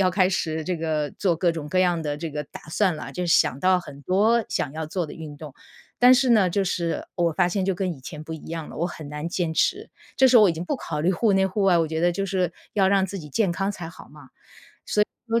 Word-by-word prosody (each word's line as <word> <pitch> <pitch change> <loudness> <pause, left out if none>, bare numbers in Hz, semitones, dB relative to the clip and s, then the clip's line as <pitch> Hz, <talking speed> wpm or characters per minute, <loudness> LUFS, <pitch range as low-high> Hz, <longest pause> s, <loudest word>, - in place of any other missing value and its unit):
要 185 -1 +3
开 185 0 +3
始 160 -4 -2
这 180 -1 -2
个 155 -3 -1
做 180 -4 +1
各 170 +1 +2
种 155 -3 -6
各 185 - 0
样 175 -2 +2
的 150 -2 -3
这 160 +1 -5
个 150 0 -4
打 - - -12
算 185 -3 +1
了， - - -7
就 180 - -3
想 140 -5 +3
到 185 0 +4
很 145 -5 -10
多 215 - +2
想 140 - -2
要 160 +1 -4
做 175 +3 -2
的 - - -9
运 155 -2 -9
动， 145 -2 -10 0.4
但 250 +1 +7
是 260 -1 +2
呢， 210 -5 +5
就 195 +3 0
是 170 -2 -2
我 170 -2 +1
发 175 +3 +2
现 190 +1 -1
就 195 - +1
跟 185 -1 -2
以 140 - -11
前 150 +3 -8
不 160 - -7
一 160 - -8
样 165 -1 -5
了， - - -10
我 170 - +1
很 155 -4 -8
难 150 +3 -4
坚 170 -2 -1
持。 395 - 0 0.3
这 265 - +6
时 255 -1 +6
候 - - +7
我 195 - +5
已 - - -1
经 165 +2 -5
不 - - -1
考 150 - -4
虑 175 +5 +2
户 210 +3 +2
内、 190 0 +3
户 195 +2 -2
外， 185 -2 +5
我 165 - +2
觉 160 +1 -3
得 175 +1 +3
就 195 +3 -2
是 185 -2 0 0.2
要 195 -2 +3
让 195 -1 +3
自 195 +1 -5
己 150 -4 -9
健 185 +5 +1
康 195 +3 -1
才 175 -5 -7
好 - - -13
嘛。 145 -3 -16 1.0
所 225 - +1
以 - - -1
175 Hz, 300 characters per minute, -24 LUFS, 160-195 Hz, 1.0 s, 但